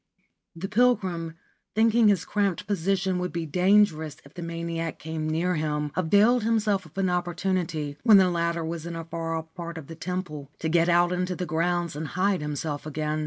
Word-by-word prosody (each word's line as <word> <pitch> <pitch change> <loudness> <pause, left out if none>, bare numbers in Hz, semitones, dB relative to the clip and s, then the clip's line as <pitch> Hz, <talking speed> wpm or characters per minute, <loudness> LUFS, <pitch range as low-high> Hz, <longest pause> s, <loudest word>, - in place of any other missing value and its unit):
' - - -55
The - - 0
pilgrim, 190 -8 +1 0.4
thinking 225 +1 +4
his 190 -4 +3
cramped 200 -3 0
position 190 -1 0
would 180 0 -2
be 170 -1 -3
dangerous 180 -2 +2
if 140 - -16
the 175 - -8
maniac 165 -1 -4
came 155 0 -4
near 170 +3 +1
him, 150 -2 -1
availed 205 +8 +4
himself 215 -3 +1
of - - -21
an 195 -1 +2
opportunity, 175 -4 -1
when 220 -4 +7
the 185 -2 +5
latter 170 -1 -1
was 165 0 -5
in 170 - -5
a 165 0 -5
far 165 0 -3
off 160 0 -6
part 170 -1 -6
of 160 - -7
the 165 - -9
temple, 160 -4 -5
to 160 - -2
get 170 +1 +3
out 175 +1 +4
into 180 0 -1
the 180 - -3
grounds 170 0 0
and 155 +1 -4
hide 190 -1 +2
him 150 0 -3
self 150 0 -4
again. 155 0 -2
170 Hz, 200 wpm, -26 LUFS, 160-190 Hz, 0.4 s, when